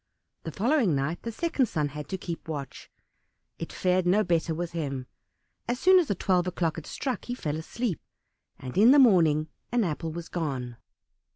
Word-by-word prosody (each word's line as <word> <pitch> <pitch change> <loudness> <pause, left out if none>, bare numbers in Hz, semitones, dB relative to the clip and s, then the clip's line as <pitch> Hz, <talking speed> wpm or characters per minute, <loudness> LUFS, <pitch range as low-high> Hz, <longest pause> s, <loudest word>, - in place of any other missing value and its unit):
The 160 - -4
following 230 - +2
night 140 +5 -2
the 230 - -4
second 280 -1 0
son 150 -7 -1
had 150 0 -8
to 190 - -2
keep 170 -3 -6
watch, 145 -4 -6 0.7
it 165 - -5
fared 180 0 +1
no 205 +4 +4
better 165 -2 0
with 170 +1 -3
him; 140 -6 -3 0.6
as 245 +1 -1
soon 370 +1 +6
as 330 - 0
twelve 180 -1 +1
o'clock 170 -3 -1
had 165 - -7
struck 260 -3 -3
he 245 - -3
fell 150 -11 -3
asleep, 190 +5 -3 0.6
and 130 -1 -8
in 220 +4 +7
the 280 - +7
morning 165 - +5 0.2
an 240 -1 +2
apple 165 -2 -2
was 170 +1 -6
gone. 130 -8 -4
170 Hz, 180 wpm, -27 LUFS, 155-225 Hz, 0.7 s, in